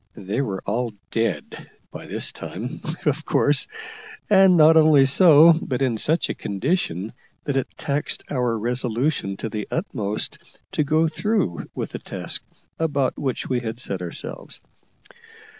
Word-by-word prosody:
They 100 +5 -2
were 100 -8 -3
all 115 +2 -1 0.2
dead 115 0 -2 0.2
by - - -9
this - - -1
time, 115 +7 -7 0.2
of 150 +1 +1
course, 145 -2 +2 0.6
and 190 -2 +7
not 160 +1 +7
only 155 -3 +6
so, 160 +2 +7
but 130 0 -2
in 120 -4 0
such 160 +8 +1
a - - -2
condition 105 - -2 0.3
that 145 - -2
it 135 - 0
taxed 145 -1 -2
our 125 -4 0
resolution 120 -1 -1
to - - -4
the 105 -1 -4
utmost 105 - -3 0.3
to - - +1
go 155 +3 +2
through 185 - -1
with - - -4
the - - -5
task - - -5 0.4
about 145 -5 0
which 130 -3 -2
we 125 -2 0
had 115 -1 -5
set 95 -7 -3
ourselves. 90 -2 -4
130 Hz, 145 wpm, -23 LUFS, 110-155 Hz, 0.6 s, and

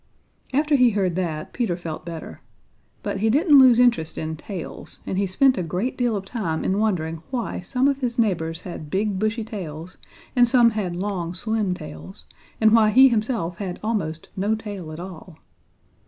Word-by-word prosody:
After 295 +3 +1
he 250 -3 +6
heard 195 -5 0
that, 160 -4 -3
Peter 225 -9 -1
felt 165 -2 -7
better. 165 -1 -7 0.6
But 195 - -2
he 220 +2 +2
didn't 290 - +6
lose 255 -3 +7
interest 235 -10 +3
in 160 0 -3
tails, 180 +2 -7
and - - -3
he 195 +1 +1
spent 255 +7 +3
a - - 0
great 180 +9 -2
deal 245 -3 0
of 195 -1 -4
time 195 -8 -3
in 195 +2 0
wondering 165 -7 -1
why 250 -3 -3
some 250 +9 +1
of 280 -1 +1
his 245 -3 -2
neighbors 165 -7 0
had 165 -4 -8
big, 195 +2 -1
bushy 215 +2 0
tails 180 -6 -7 0.4
and 245 -1 +6
some 235 -1 +5
had 195 -5 -3
long, 180 -2 -3
slim 215 -2 -1
tails 80 - -10 0.3
and 220 -1 +5
why 220 -1 +6
he 265 +5 +7
himself 215 -7 -1
had 185 -3 -4
almost 190 -8 -2
no 205 +3 +1
tail 205 -7 -7
at 155 - -8
all. 180 -2 -10
200 Hz, 185 wpm, -23 LUFS, 170-230 Hz, 0.6 s, lose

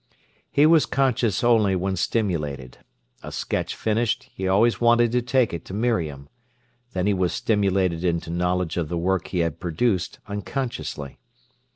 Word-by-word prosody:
He 145 - +4
was 160 -1 +5
conscious 125 -6 +1
only 110 -5 +4
when 95 +1 -1
stimulated. 75 - -2 0.4
A - - -8
sketch - - -3
finished, 110 +1 -1
he 95 - -3
always 110 +6 +3
wanted 120 0 +4
to 125 +1 +2
take 125 -2 +1
it 85 - -5
to 95 - -7
Miriam. 85 - -1 0.7
Then 90 0 -1
he 105 - +3
was 90 -2 0
stimulated 95 -5 +1
into 85 -2 -1
knowledge 90 0 -1
of 80 -4 -1
the 85 - -2
work 90 +1 0
he 90 - -1
had 85 -4 -2
produced 90 +2 -1
unconsciously. 100 - -5
95 Hz, 155 wpm, -24 LUFS, 85-115 Hz, 0.7 s, was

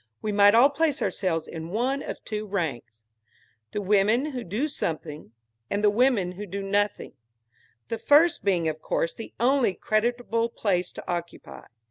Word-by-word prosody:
We 215 - -3
might 205 +1 +6
all 260 +5 +6
place 305 0 0
ourselves 165 -4 -1
in 160 0 -7
one 255 +8 -1
of - - -7
two 215 -1 -4
ranks 140 - -4 0.7
the 205 - -3
women 210 +9 +2
who 250 -3 -5
do 215 - -2
something 155 - -5 0.4
and 205 +1 -1
the 210 - +5
women 220 -5 +2
who 205 +3 -8
do 200 +2 -5
nothing; 205 +1 -1 0.7
the 230 - -4
first 305 +8 +4
being 180 -5 +1
of 155 0 -3
course 165 - -1
the 225 - -9
only 245 -4 +2
creditable 230 +1 0
place 185 -6 -1
to - - -10
occupy. 175 -1 -6
205 Hz, 160 wpm, -26 LUFS, 180-240 Hz, 0.7 s, might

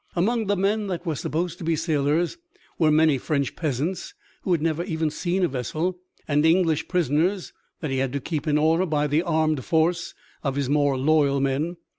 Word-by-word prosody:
Among 220 +5 +1
the 205 - +2
men 205 +2 0
that 180 -2 -4
were 165 - 0
supposed 165 +5 -3
to - - -7
be 165 0 +1
sailors 160 - 0 0.4
were 160 -2 +4
many 155 -2 +4
French 140 -1 -1
peasants 155 +4 -3 0.3
who 185 - -2
had 170 - +3
never 165 +1 0
even 160 -4 -1
seen 180 +4 -1
a - - +1
vessel 155 +7 -3 0.3
and 150 0 +2
English 160 -1 +3
prisoners 175 +3 0 0.3
that 155 - -3
he 135 - 0
had 135 -1 0
to 140 - -1
keep 155 +2 -4
in 150 -1 +3
order 165 +4 +2
by 150 -2 +1
the 150 +2 +2
armed 155 -5 0
force 170 +3 0 0.3
of 135 -3 -2
his 140 -2 -1
more 145 -1 +2
loyal 140 0 +3
men. 140 +6 -1
160 Hz, 195 wpm, -24 LUFS, 145-175 Hz, 0.4 s, were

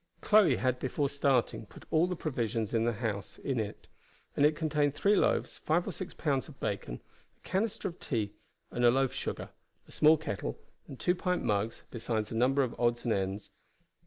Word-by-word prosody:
Chloe 205 -10 +5
had 125 0 0
before 140 +2 -1
starting 135 -6 +1
put - - -14
all 160 +2 +4
the 180 - -2
provisions 115 - -2
in 115 0 +2
the 120 - +1
house 105 -3 -4
into 125 -5 -1
it, 105 - -11 0.5
and 145 - +6
it 150 - 0
contained 150 -2 +1
three 200 +7 +3
loaves, - - +1
five 170 +3 +1
or - - -1
six 185 - -6
pounds 140 -5 -1
of 150 -4 -14
bacon, 100 -11 -3 0.4
a - - -17
canister 200 +2 -1
of 170 - -13
tea 105 -5 -2 0.4
and 120 - -2
loaf 130 +2 +4
sugar, - - -4 0.4
a - - -16
small 155 +1 +5
kettle, 120 -10 -4 0.3
and 135 - -10
two 180 - +2
pint 180 0 -1
mugs, 105 +2 -1
besides 110 -2 -2
a - - -3
number 135 +4 +3
of 125 - -2
odds 120 0 +1
and 115 - +2
ends. 95 +1 -3
130 Hz, 190 wpm, -31 LUFS, 115-155 Hz, 0.5 s, and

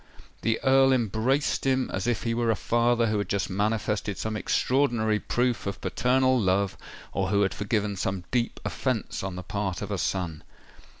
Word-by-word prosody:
_" - - -23
The 115 0 +1
Earl 135 0 +5
embraced 120 +4 +1
him 130 -1 +1
as 95 +4 -2
if 120 - 0
he 115 - 0
were 120 0 0
a 110 - +3
father 120 +2 +2
who 105 -2 0
had 100 - -3
just 100 -1 -1
manifested 105 0 -1
some 110 0 -3
extraordinary 110 -1 +1
proof 120 -2 0
of 100 - -4
paternal 130 +1 +2
love, 95 0 +1 0.4
or 95 -1 0
who 100 +1 +3
had 95 - 0
forgiven 105 0 -1
some 95 -1 -2
deep 120 -2 0
offence 125 -6 -2
on 95 -1 -4
the 90 - -6
part 95 0 -3
of 105 - -5
a 100 - -1
son. 85 -4 -2
110 Hz, 185 wpm, -27 LUFS, 100-120 Hz, 0.4 s, Earl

